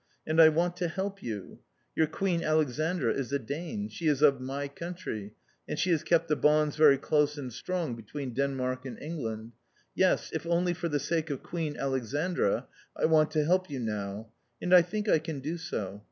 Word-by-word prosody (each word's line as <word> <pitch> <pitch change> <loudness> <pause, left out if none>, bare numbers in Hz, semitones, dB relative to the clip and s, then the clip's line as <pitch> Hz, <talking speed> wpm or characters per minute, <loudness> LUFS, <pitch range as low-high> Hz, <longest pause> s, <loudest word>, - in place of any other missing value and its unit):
And 160 +1 +4
I 160 - +9
want 170 +3 +1
to 180 -1 0
help 195 +3 -4
you. 105 -5 -6 0.4
Your 160 - +3
Queen 175 +1 -1
Alexandra 155 -2 +1
is 135 -2 -3
a 140 - +2
Dane. 170 +10 -4
She 170 -6 -4
is 150 -1 +2
of 140 -3 +5
my 140 +2 -3
country, 140 - -6 0.3
and - - -2
she 180 - +1
has 160 -3 +3
kept 165 -1 +2
the 150 - +2
bonds 150 0 +3
very 150 -3 +6
close 150 +1 +1
and 130 -4 -6
strong 170 +1 -2
between 125 +4 -6
Denmark 130 -1 -1
and 130 - -7
England. 115 -8 -5 0.4
Yes, 185 -1 +2
if 160 - -2
only 175 +1 +2
for 170 0 -3
the 145 -1 0
sake 160 +1 -1
of 140 -3 -4
Queen 160 -4 -3
Alexandra 135 - 0 0.3
I - - +2
want 155 -1 +4
to 155 -2 +2
help 185 +2 +2
you 140 -3 -4
now. 105 -1 -4 0.3
And 180 - 0
I 180 - +10
think 210 +5 -3
I 160 - +5
can 155 -2 -5
do 150 +5 -3
so. 100 -11 -4
150 Hz, 195 wpm, -29 LUFS, 130-170 Hz, 0.4 s, I